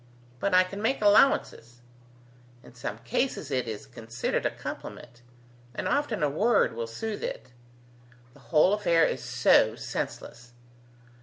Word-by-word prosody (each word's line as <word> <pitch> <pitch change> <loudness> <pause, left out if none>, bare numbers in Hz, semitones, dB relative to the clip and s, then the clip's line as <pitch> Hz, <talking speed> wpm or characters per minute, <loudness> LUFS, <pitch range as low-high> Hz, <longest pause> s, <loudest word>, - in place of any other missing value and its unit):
But 195 -2 +1
I 185 - +7
can 195 +2 -7
make 245 +5 0
allowances. 205 - +3 0.9
In - - -16
some 115 -4 -6
cases, 150 - -2
it 130 -3 -1
is 110 +4 -6
considered 120 -3 -3
a - - -1
compliment; 120 0 -9 0.5
and - - -3
often 265 - 0
a - - +4
word 205 - +2
will 115 0 -4
soothe 210 - -5
it. 130 - -6 0.8
The 145 - -19
whole 165 +4 +4
affair 170 -6 +3
is - - -2
so - - +3
senseless! 120 0 -6
150 Hz, 140 wpm, -27 LUFS, -, 0.9 s, I